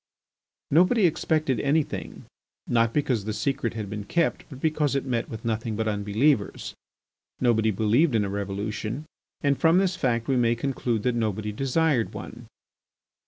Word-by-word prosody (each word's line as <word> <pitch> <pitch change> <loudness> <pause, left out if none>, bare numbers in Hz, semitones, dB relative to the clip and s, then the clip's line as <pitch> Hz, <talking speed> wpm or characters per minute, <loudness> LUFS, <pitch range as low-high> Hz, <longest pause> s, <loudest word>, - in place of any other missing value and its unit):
Nobody 180 - +4
expected 155 -5 +1
anything, 145 +2 -1 0.4
not 115 -1 +2
because 125 -6 0
the 110 - -2
secret 120 +1 -1
had 110 -2 -4
been 105 +1 -5
kept 170 +8 0
but 135 -4 -10
because 150 -2 +1
it 140 - -1
met 120 -3 -2
with 110 0 -8
nothing 110 -1 -2
but 110 +1 -1
unbelievers. 105 +3 0 0.7
Nobody 110 -3 +3
believed 115 - +2
in 105 -2 +2
a - - -3
revolution, 100 +6 -4 0.4
and 140 -2 +1
from 165 +2 +4
this 190 -1 +2
fact 120 -8 0
we 135 - +2
may 120 -1 +3
conclude 120 -3 -2
that 125 0 +1
nobody 110 -2 -1
desired 135 +2 0
one. - - -9
120 Hz, 155 wpm, -26 LUFS, 110-145 Hz, 0.7 s, Nobody